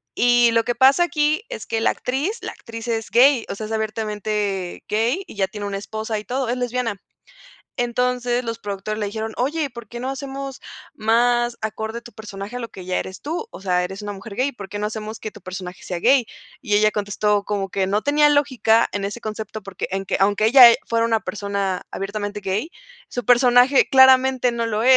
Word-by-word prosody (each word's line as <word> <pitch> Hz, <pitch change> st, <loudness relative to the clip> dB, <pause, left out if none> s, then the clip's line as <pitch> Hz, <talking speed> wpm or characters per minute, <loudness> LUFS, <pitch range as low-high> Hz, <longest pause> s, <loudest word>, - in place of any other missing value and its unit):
Y 240 Hz, -1 st, +4 dB
lo 230 Hz, -, +3 dB
que 240 Hz, -, -1 dB
pasa 270 Hz, +7 st, +5 dB
aquí 310 Hz, +2 st, +1 dB
es -, -, -7 dB
que 225 Hz, 0 st, -1 dB
la -, -, +3 dB
actriz, 295 Hz, -, -2 dB
la -, -, -5 dB
actriz 230 Hz, +1 st, -9 dB
es 225 Hz, -1 st, -2 dB
gay, 255 Hz, 0 st, +5 dB
o -, -, -2 dB
sea, 215 Hz, +2 st, -6 dB
es 225 Hz, -, -9 dB
abiertamente 210 Hz, -3 st, -2 dB
gay 230 Hz, -, +1 dB
y -, -, -12 dB
ya 200 Hz, -2 st, +1 dB
tiene 205 Hz, +1 st, -6 dB
una 200 Hz, -1 st, -3 dB
esposa 220 Hz, +2 st, -4 dB
y 210 Hz, -, -5 dB
todo, 250 Hz, +3 st, -2 dB
es 245 Hz, -, -1 dB
lesbiana. 245 Hz, -4 st, -2 dB, 0.8 s
Entonces, 245 Hz, 0 st, 0 dB
los 230 Hz, 0 st, -4 dB
productores 205 Hz, +1 st, -4 dB
le 205 Hz, -, -1 dB
dijeron: 220 Hz, +2 st, -4 dB
"Oye, 290 Hz, +4 st, -1 dB
¿por 235 Hz, -3 st, -11 dB
qué 240 Hz, -, -7 dB
no 255 Hz, +2 st, -4 dB
hacemos 270 Hz, 0 st, -6 dB, 0.3 s
más 240 Hz, +2 st, +2 dB
acorde 220 Hz, +2 st, -4 dB
tu 235 Hz, -, -13 dB
personaje 205 Hz, 0 st, -8 dB
a 250 Hz, -, -4 dB
lo 230 Hz, -, -5 dB
que 185 Hz, -, -11 dB
ya 185 Hz, 0 st, -1 dB
eres 190 Hz, -, -8 dB
tú, 340 Hz, +10 st, -4 dB
o -, -, -10 dB
sea, 180 Hz, -2 st, +1 dB
eres 190 Hz, +3 st, -5 dB
una 205 Hz, -1 st, -5 dB
mujer 200 Hz, +1 st, -10 dB
gay. 275 Hz, +2 st, 0 dB
¿Por 200 Hz, -5 st, -9 dB
qué 205 Hz, -, -6 dB
no 210 Hz, -, -1 dB
hacemos 215 Hz, 0 st, -6 dB
que 215 Hz, -, -7 dB
tu 210 Hz, -, -13 dB
personaje 185 Hz, 0 st, -8 dB
sea 180 Hz, -, -4 dB
gay? 250 Hz, +5 st, +4 dB, 0.4 s
Y 215 Hz, -7 st, +1 dB
ella 215 Hz, 0 st, +4 dB
contestó 205 Hz, 0 st, 0 dB
como 200 Hz, -1 st, -3 dB
que 190 Hz, 0 st, -1 dB
no 205 Hz, +2 st, +1 dB
tenía 295 Hz, +1 st, +4 dB
lógica 260 Hz, -6 st, +3 dB
en 200 Hz, -1 st, -2 dB
ese 205 Hz, +4 st, -4 dB
concepto 215 Hz, 0 st, -6 dB
porque 195 Hz, -2 st, -6 dB
en 195 Hz, 0 st, -2 dB
que -, -, -1 dB
aunque 205 Hz, +2 st, +3 dB
ella 245 Hz, 0 st, +10 dB
e 230 Hz, -, +3 dB
fuera 230 Hz, 0 st, +1 dB
una 225 Hz, -1 st, +2 dB
persona 200 Hz, -3 st, -3 dB
abiertamente 205 Hz, +1 st, -4 dB
gay, 205 Hz, -, -2 dB, 0.4 s
su 245 Hz, -, -5 dB
personaje 245 Hz, +2 st, +5 dB
claramente 260 Hz, -1 st, +5 dB
no 235 Hz, -1 st, -1 dB
lo 215 Hz, +1 st, -1 dB
es. 260 Hz, 0 st, +7 dB
225 Hz, 215 wpm, -22 LUFS, 205-250 Hz, 0.8 s, ella